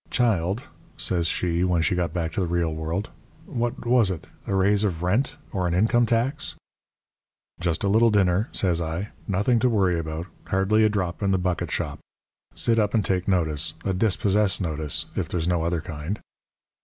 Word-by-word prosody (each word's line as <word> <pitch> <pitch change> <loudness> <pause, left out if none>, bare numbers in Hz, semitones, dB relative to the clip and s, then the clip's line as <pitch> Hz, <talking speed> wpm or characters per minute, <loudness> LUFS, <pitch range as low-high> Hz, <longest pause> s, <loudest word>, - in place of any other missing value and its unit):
"'Child,' 105 -3 +1 0.3
says 85 +8 0
she, 85 0 0
when 90 -2 +2
she - - +2
got 90 -3 0
back 85 -1 -2
to - - -2
the - - -1 0.3
world, 80 +6 -3 0.3
'what 120 +1 -3
was 120 -4 +4
it? 90 -4 -4 0.2
A 100 - 0
raise 100 +2 +3
of 90 -5 -1
rent 125 +11 +1
or 90 -3 -1
an 85 - 0
income 115 +5 +3
tax?' 120 +6 0 1.0
"'Just 85 -1 -1
a - - +2
little 110 +4 +5
dinner,' 100 0 +2
says 85 -3 +1
I. 85 +5 -3 0.2
'Nothing 105 +5 +2
to 125 - +3
worry 95 -6 +2
about 80 +1 -4 0.2
hardly 95 +3 +2
a 110 - +5
drop 95 -4 -2
in 100 - +1
the 95 - +3
bucket 90 -1 -1
shop. - - -3 0.6
Sit 115 -1 +2
up 105 +1 +1
and 105 -4 +2
take 90 -2 0
notice 80 -6 +1
a 95 - +1
dispossess 100 0 +2
notice, 80 -5 -1
if - - -2
there's 85 -2 -1
no 90 -2 +1
other 85 0 0
kind.' 80 +5 -5
95 Hz, 180 wpm, -25 LUFS, 85-105 Hz, 1.0 s, little